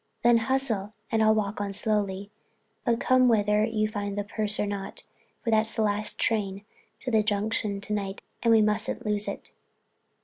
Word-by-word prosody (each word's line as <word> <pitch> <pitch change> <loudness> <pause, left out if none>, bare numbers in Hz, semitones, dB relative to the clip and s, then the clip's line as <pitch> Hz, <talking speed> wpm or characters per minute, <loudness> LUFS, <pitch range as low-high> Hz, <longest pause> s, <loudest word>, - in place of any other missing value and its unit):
"Then 240 0 +6
hustle 225 -4 0 0.2
and 225 -1 +2
I'll 220 0 +5
walk 205 -1 -1
on 200 -1 -3
slowly. 205 -2 -1 0.5
But 235 -1 +2
come 255 0 +4
whether 210 -2 +3
you 215 -1 +1
find 205 -2 -4
the 205 - 0
purse 210 0 -1
or - - +2
not, 200 -1 -5 0.4
for 235 - 0
that's 220 0 +2
the 220 - +1
last 210 0 -1
train 200 -3 -1 0.4
to 255 - -3
the 220 -1 +4
Junction 210 -1 -1
to 210 - -4
night, 195 -1 -3 0.2
and 230 - +3
we 220 -1 +6
mustn't 210 +1 -1
lose 210 -1 0
it." - - -6
215 Hz, 180 wpm, -27 LUFS, 205-225 Hz, 0.5 s, Then